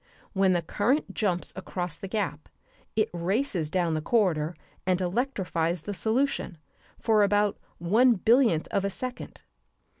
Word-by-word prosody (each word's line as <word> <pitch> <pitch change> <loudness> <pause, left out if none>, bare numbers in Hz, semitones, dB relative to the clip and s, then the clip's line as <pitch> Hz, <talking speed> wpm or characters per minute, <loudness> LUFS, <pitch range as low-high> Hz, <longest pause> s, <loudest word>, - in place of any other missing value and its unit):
When 190 -2 +3
the 175 -1 0
current 240 - 0
jumps 180 -5 -1
across 180 -3 -4
the 195 - -6
gap 190 -7 -3 0.5
it 215 -1 +2
races 180 - -1
down 175 -1 0
the 155 - -1
corridor 170 -5 +1 0.3
and 185 -1 +1
electrifies 180 - -1
the 205 - -4
solution 225 -3 0 0.4
for 220 -2 +3
about 205 0 +2 0.2
one 225 +9 +4
billionth 225 - +3
of 195 - +1
a 200 - 0
second. 250 +5 -6
195 Hz, 140 wpm, -27 LUFS, 175-220 Hz, 0.5 s, one